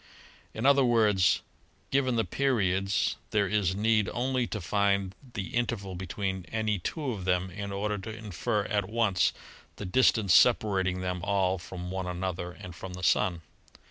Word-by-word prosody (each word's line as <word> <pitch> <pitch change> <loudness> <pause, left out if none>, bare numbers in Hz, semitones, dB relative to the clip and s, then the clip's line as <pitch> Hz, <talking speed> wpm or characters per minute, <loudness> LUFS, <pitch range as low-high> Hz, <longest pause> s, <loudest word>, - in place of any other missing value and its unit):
In 110 - -3
other 140 0 +6
words, 105 -6 +3 0.5
given 130 -2 +2
the 115 - +1
periods, 100 -8 +1
there 105 -2 +2
is 95 -2 +1
need 110 -1 +2
only 125 0 0
to 105 - -4
find 100 +1 +1 0.2
the 95 -4 -3
interval 115 -5 -2
between 95 +1 -3
any 110 -2 0
two 145 - -3
of 100 -5 -5
them 90 0 0
in 100 +2 -5
order 105 +1 -2
to 100 +4 -7
infer 110 0 -2
at 100 -2 -1
once 110 -5 +2 0.4
the 105 - -7
distance 105 -2 +3
separating 95 -6 +3
them 90 -1 -3
all 95 -2 +1
from 90 0 -7
one 95 -1 -3
another 90 0 -3
and 90 0 -10
from 90 0 -8
the 90 0 -8
Sun. 85 -2 +2
100 Hz, 160 wpm, -29 LUFS, 95-110 Hz, 0.5 s, other